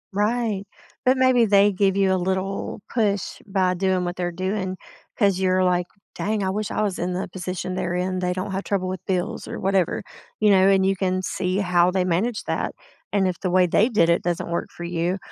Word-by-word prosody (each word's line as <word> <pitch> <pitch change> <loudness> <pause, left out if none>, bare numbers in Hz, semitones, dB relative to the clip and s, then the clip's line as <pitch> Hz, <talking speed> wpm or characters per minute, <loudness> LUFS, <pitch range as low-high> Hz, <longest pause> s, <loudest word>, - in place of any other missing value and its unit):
Right, 215 -1 0 0.4
but 260 +1 +4
maybe 255 -3 +4
they 200 0 +5
give 195 0 +1
you 195 -1 +3
a - - +3
little 190 +3 -2
push 205 -5 0
by 190 -2 +1
doing 185 0 0
what 175 +1 -3
they're 175 -1 -2
doing, 185 +1 -3 0.4
'cause 200 -4 +2
you're 185 0 +2
like, 180 -1 +1 0.3
"Dang, 210 -1 -1
I 190 - 0
wish 210 +2 -2
I 215 - -1
was 200 -3 -2
in 180 +1 -1
the 185 - -3
position 185 0 -5
they're 180 -1 -2
in. 185 +1 -1
They 180 0 0
don't 185 +2 -3
have 190 +1 -2
trouble 190 -2 -1
with 185 -1 -5
bills 190 +4 -2
or - - -5
whatever." 195 -3 +1 0.4
you 210 -1 +4
know, 190 0 +5
and 195 -1 +4
you 195 0 +2
can 185 0 -1
see 185 0 -1
how 180 -2 +3
they 185 0 0
manage 205 +6 0
that. - - -2 0.4
And 195 -2 +2
if 180 - -3
the 185 - -1
way 185 0 +4
they 210 +7 +3
did 170 -7 +3
it 170 - +3
doesn't 175 -1 -2
work 170 - -2
for 175 - -9
you, 175 +2 -1
190 Hz, 220 wpm, -23 LUFS, 180-200 Hz, 0.4 s, they